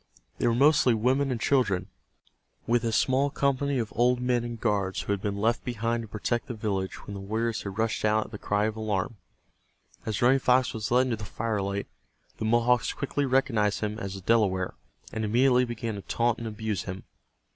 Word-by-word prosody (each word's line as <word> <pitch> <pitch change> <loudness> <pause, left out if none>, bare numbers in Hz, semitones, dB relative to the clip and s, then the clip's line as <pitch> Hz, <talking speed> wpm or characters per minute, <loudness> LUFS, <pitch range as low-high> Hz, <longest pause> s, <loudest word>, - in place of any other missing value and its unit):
They - - +2
were 115 - +2
mostly 135 -2 +5
women 130 +5 +1
and 125 -3 -1
children, 105 -7 +1 0.8
with 120 0 +2
a 115 - 0
small 130 +5 +2
company 140 0 0
of 115 -3 -3
old 125 +2 +3
men 125 -1 +1
and 120 -1 -5
guards 100 -4 0
who - - -4
had 100 - -3
been 100 -1 -2
left 115 +3 +1
behind 115 -1 -1
to 115 - -8
protect 115 +5 -2
the 125 - -5
village 100 -3 -3
when 100 - -7
the 100 - -6
warriors 110 +3 -2
had 100 -1 -6
rushed 115 0 0
out 110 0 +2
at - - -13
the 105 - -7
cry 105 +1 0
of 110 0 -2
alarm. 110 -1 -2 0.9
As 110 -3 -2
Running 130 +3 +5
Fox 125 0 +3
was 110 -1 -3
led 125 +1 +4
into 120 -3 -1
the 105 - -8
firelight 100 -2 -2 0.5
the - - -2
Mohawks 120 +2 +2
quickly 140 0 -2
recognized 115 -6 +1
him 105 0 -2
as 100 -2 -5
a 95 - -7
Delaware, 95 -3 +2 0.4
and 110 - -2
immediately 125 +3 +3
began 115 -1 -4
to 100 - -6
taunt 120 +3 0
and 115 - -4
abuse 105 -3 -3
him. 95 0 -6
115 Hz, 200 wpm, -27 LUFS, 105-125 Hz, 0.9 s, mostly